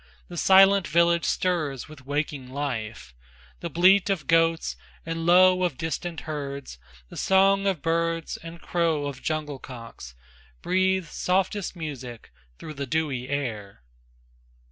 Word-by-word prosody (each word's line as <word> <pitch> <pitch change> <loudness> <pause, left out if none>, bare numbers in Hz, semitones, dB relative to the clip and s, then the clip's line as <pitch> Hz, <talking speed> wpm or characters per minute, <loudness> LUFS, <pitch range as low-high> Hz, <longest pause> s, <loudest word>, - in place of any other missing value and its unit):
The 175 - -8
silent 195 +1 +5
village 170 +2 +3
stirs 155 -8 -1
with 140 -4 -14
waking 145 -2 -3
life, 115 - -5 0.5
The - - -5
bleat 190 +3 +4
of 180 -8 -1
goats 165 +1 +2 0.3
and 165 0 -3
low 185 +1 +6
of 175 -8 0
distant 165 +1 -4
herds, 140 - -6 0.3
The - - -11
song 195 +1 +3
of 185 -7 -1
birds 165 0 -1
and 165 0 -10
crow 165 -4 0
of 140 -2 -6
jungle 150 -3 -3
cocks 115 - -10 0.5
Breathe 190 0 +1
softest 190 +4 -1
music 130 -8 -7 0.3
through 155 - -8
the 140 -1 -5
dewy 135 -4 -2
air. 110 - -4
160 Hz, 130 wpm, -25 LUFS, 140-175 Hz, 0.5 s, low